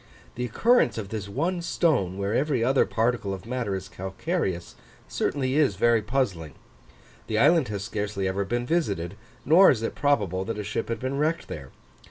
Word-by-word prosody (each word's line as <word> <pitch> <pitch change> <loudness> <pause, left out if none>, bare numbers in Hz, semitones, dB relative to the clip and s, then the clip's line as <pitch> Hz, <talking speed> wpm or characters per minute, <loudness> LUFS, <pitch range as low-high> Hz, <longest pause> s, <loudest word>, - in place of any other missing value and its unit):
The 125 - -3
occurrence 230 - +3
of 105 -3 -5
this 105 -2 -5
one 170 - -1
stone, 140 - +1
where 100 +1 -1
every 135 -2 +1
other 130 +3 +3
particle 115 -4 0
of 95 - -12
matter 115 -4 -2
is 95 0 -5
calcareous, 95 - -3 0.3
certainly 130 -2 -1
is 145 -10 +3
very 115 +3 +3
puzzling. 105 - -2 0.7
The 110 - -1
island 150 +3 +4
has 100 -2 -4
scarcely 105 -2 -3
ever 95 +1 -1
been 120 +4 -2
visited, 100 - -1 0.3
nor 170 +7 +7
is 115 -4 +1
it - - -2
probable 100 -11 +1
that 115 0 -4
a 105 - -3
ship 100 +3 -3
had 115 -1 -2
been 130 +3 -2
wrecked 160 +3 0
there. 70 -6 -7
115 Hz, 180 wpm, -26 LUFS, 100-140 Hz, 0.7 s, nor